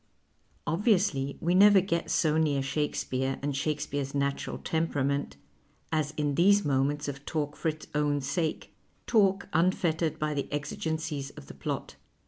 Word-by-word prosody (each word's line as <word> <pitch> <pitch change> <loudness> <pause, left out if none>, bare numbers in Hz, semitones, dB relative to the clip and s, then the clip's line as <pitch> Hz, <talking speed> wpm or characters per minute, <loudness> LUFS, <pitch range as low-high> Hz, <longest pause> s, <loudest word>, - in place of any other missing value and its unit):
Obviously 165 - +1
we 175 +2 +1
never 200 +1 +7
get 170 -3 -1
so 155 -1 +2
near 150 -4 +2
Shakespeare 135 -2 -1
and 145 -1 -1
Shakespeare's 145 -1 -2
natural 140 0 -1
temperament, 140 - -1 0.5
as 155 -2 +1
in 145 -1 0
these 200 +6 +4
moments 145 +1 +1
of 140 0 -5
talk 150 -1 -2
for - - -3
its 155 0 -3
own 145 -1 +1
sake, 145 +4 -2 0.3
talk 200 -3 +3
unfettered 165 -1 +1
by 150 0 -1
the 140 -1 -3
exigencies 150 0 -3
of 70 - -10
the - - -11
])lot. - - -3
150 Hz, 140 wpm, -29 LUFS, 140-165 Hz, 0.5 s, never